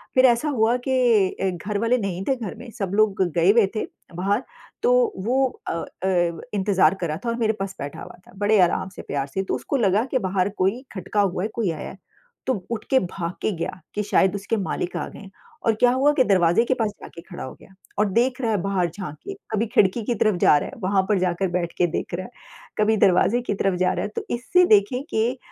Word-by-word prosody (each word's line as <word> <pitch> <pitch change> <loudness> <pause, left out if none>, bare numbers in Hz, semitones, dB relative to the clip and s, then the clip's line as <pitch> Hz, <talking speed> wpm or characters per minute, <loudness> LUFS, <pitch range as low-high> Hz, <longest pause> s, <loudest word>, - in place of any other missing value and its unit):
फिर 255 0 +6
ऐसा 245 +4 +3
हुआ 235 -3 +2
कि 240 -7 +3
अ, 190 - +2
घर 195 +4 -4
वाले 230 +3 +2
नहीं 195 -5 -3
थे। 270 - +3
घर 225 -6 -6
में 245 - -10
सब 195 -3 -2
लोग 210 -3 +3
गए 170 +3 +5
हुए 225 0 +5
थे 215 - -1 0.3
बाहर, 200 +7 0 0.4
तो - - +3
वो 265 +3 +2 0.2
अ - - -1
अ, 175 0 -1
इंतज़ार 195 -2 +3
कर 170 - 0
रहा 155 0 -3
था - - 0
और 230 - -1
मेरे 220 -1 +2
पास 195 0 -4
बैठा 140 0 -6
हुआ - - -10
था, - - -16
बड़े 205 +1 +3
आराम 180 +1 +1
से - - -7
प्यार 140 -1 -3
से, 190 +7 -3
तो - - -2
उसको - - -3
लगा 210 -1 +2
कि 260 - +2
बाहर 185 0 +1
कोई 200 +7 +1
खटका 205 +1 -1
हुआ 185 -2 0
है, - - 0
कोई 220 -7 0
आया 155 - -6
है, - - -11 0.5
तो 260 - +3 0.2
उठ 220 -2 -3
के 265 - +5
भाग 175 -3 -4
के - - +1
गया 170 +2 -4 0.2
कि 210 - 0
शायद 195 -1 +2
उसके 205 +3 -2
मालिक 190 -3 -3
आ - - -3
गए - - -12
हैं 195 -2 -12 0.4
और 225 - +5
क्या 245 +3 +4
हुआ 270 +3 +3
कि 270 - +4
दरवाज़े 185 -1 +3
के 260 - +2
पास 225 -4 0
जाके 170 - -10
खड़ा 175 +1 -9
हो 130 - -7
गया 190 - -17 0.3
और 210 -1 +3
देख 245 +5 +1
रहा 230 -3 0
है 210 - +2
बाहर 185 -2 0
झाँक 170 -3 -7
के। 395 - -3 0.2
कभी 220 +1 +1
खिड़की 205 +2 +2
की 240 - 0
तरफ 215 -1 +2
जा 150 - +6
रहा - - -5
है, - - -12
वहाँ 190 +1 +2
पर 205 -3 +3
जाकर 180 +1 0
बैठ 175 -1 -2
के 175 - +3
देख 165 - -4
रहा 185 +2 -5
है, - - -12 0.5
कभी 215 +1 +3
दरवाज़े 195 +6 +3
की 240 - -2
तरफ 195 -1 0
जा 185 0 +3
रहा - - -2
है, - - -4
तो 215 - -6
इससे 355 +9 +3
देखें 215 - +3
कि 235 +4 0
205 Hz, 245 wpm, -23 LUFS, 185-235 Hz, 0.5 s, फिर